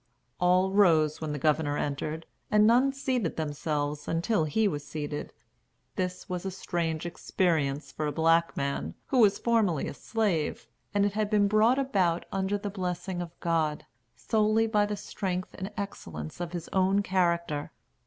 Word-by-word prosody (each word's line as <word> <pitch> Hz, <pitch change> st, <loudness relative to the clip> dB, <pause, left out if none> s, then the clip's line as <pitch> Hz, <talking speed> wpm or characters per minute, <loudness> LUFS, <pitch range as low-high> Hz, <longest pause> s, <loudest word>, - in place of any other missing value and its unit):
All 180 Hz, +1 st, +3 dB
rose 165 Hz, -7 st, +4 dB
when 155 Hz, -1 st, -3 dB
the 150 Hz, -, -2 dB
Governor 145 Hz, 0 st, +1 dB
entered, 150 Hz, +3 st, -3 dB, 0.2 s
and 210 Hz, 0 st, +5 dB
none 250 Hz, +5 st, +5 dB
seated 260 Hz, -, -1 dB
themselves 150 Hz, -1 st, -2 dB
until 165 Hz, +1 st, +1 dB
he 210 Hz, +9 st, +2 dB
was 145 Hz, -6 st, -2 dB
seated. 145 Hz, 0 st, -5 dB, 0.6 s
This 180 Hz, 0 st, -3 dB
was 180 Hz, -2 st, -3 dB
a 195 Hz, -, -2 dB
strange 170 Hz, -3 st, -2 dB
experience 160 Hz, -5 st, -1 dB
for 155 Hz, -, -3 dB
a -, -, -1 dB
black 165 Hz, +2 st, +2 dB
man, 140 Hz, 0 st, -2 dB
who 260 Hz, -, +2 dB
was 205 Hz, -4 st, +5 dB
formerly 215 Hz, -, +1 dB
a -, -, -5 dB
slave; 195 Hz, -3 st, -1 dB, 0.3 s
and 205 Hz, -1 st, +2 dB
it 205 Hz, -, 0 dB
had 210 Hz, 0 st, 0 dB
been 205 Hz, -2 st, +3 dB
brought 215 Hz, +5 st, +4 dB
about, 190 Hz, -11 st, +1 dB
under 195 Hz, +1 st, 0 dB
the 205 Hz, 0 st, -5 dB
blessing 180 Hz, -1 st, -3 dB
of 175 Hz, -1 st, -8 dB
God, 160 Hz, -3 st, 0 dB, 0.3 s
solely 220 Hz, 0 st, +2 dB
by 210 Hz, -2 st, +2 dB
the 210 Hz, 0 st, -3 dB
strength 185 Hz, -2 st, -4 dB
and 190 Hz, +2 st, -6 dB
excellence 85 Hz, -, -6 dB
of 175 Hz, -1 st, -3 dB
his 175 Hz, -2 st, -5 dB
own 195 Hz, +1 st, +2 dB
character. 170 Hz, -5 st, 0 dB
180 Hz, 165 wpm, -28 LUFS, 155-205 Hz, 0.6 s, and